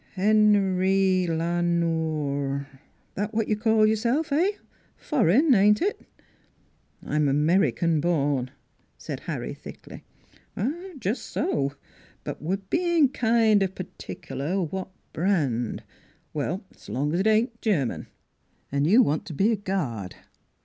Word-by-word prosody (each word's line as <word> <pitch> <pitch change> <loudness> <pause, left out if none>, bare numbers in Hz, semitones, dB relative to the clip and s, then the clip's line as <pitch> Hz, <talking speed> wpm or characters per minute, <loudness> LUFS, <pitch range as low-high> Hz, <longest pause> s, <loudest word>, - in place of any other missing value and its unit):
" - - -32
Hen 205 -1 +3
rye 190 -1 +2
La 170 +1 0
Nore 155 -5 -1 0.5
that 210 +2 -3
what 225 -1 +1
you 215 - +1
call 220 0 +3
your 215 +1 +3
self 255 +8 0
eh? 350 +8 +2 0.4
Foreign, 270 - +3
ain't 210 0 +5
it?" 405 +3 -1 0.5
" - - -34
I'm 150 -1 +1
American 160 +2 +2
born," 145 -6 0 0.5
said - - -6
Harry - - -5
thickly. - - -11 0.5
" 315 - -4
Jus' 215 +3 -2
so. 140 - -1 0.5
But - - -6
we're 180 +6 -1
bein' 330 - +2
kind 225 -4 +3
of 190 -1 -1
particular 180 -1 -5
what 185 +2 -3 0.2
brand..,.. 145 - 0 0.5
Well, 165 +7 -2
s' - - -16
long 140 +8 -1
as 175 - +1
it 195 - +1
ain't 230 +2 +1
Ger 190 - +2
man.... - - -5 0.6
An' 140 +1 +1
you 220 +10 +6
want 155 +2 -1
to 165 - -6
be 205 +9 +3
a - - +2
guard? 150 - -3
190 Hz, 140 wpm, -25 LUFS, 155-220 Hz, 0.6 s, you